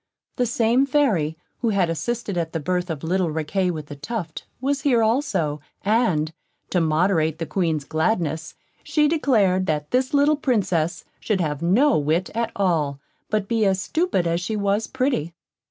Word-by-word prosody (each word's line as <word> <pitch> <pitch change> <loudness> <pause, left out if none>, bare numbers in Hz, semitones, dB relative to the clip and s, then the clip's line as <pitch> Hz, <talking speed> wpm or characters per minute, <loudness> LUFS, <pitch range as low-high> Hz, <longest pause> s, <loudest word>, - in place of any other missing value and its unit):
The 245 - +1
same 235 +4 +2
Fairy, 205 - +1 0.2
who 235 - +1
had 195 -4 +2
assisted 200 - -3
at 165 -2 -2
the 165 - -1
birth 180 +3 -1
of 160 -2 -4
little 180 +1 +1
Riquet 160 +4 -1
with 155 -4 -4
the 145 - -9
Tuft, 170 +2 -5
was 275 +2 -1
here 245 -6 +3
also; 220 - 0 0.2
and, 185 -8 +2 0.4
to 180 - +2
moderate 160 0 +2
the 165 - -3
Queen's 160 -5 -1
gladness, 160 0 -1 0.3
she 300 -1 +2
declared, 210 - +2
that 150 -1 -2
this 255 +2 +1
little 290 +1 +3
Princess 180 - 0
should 210 -4 -1
have 150 -4 -1
no 230 - +4
wit 160 +5 0
at 230 +1 -1
all, 160 -8 0 0.3
but 210 -2 0
be 225 0 +1
as 195 -2 +2
stupid 300 - 0
as 170 +1 0
she 215 +5 -2
was 205 +1 0
pretty. 255 - -1
185 Hz, 170 wpm, -23 LUFS, 160-235 Hz, 0.4 s, no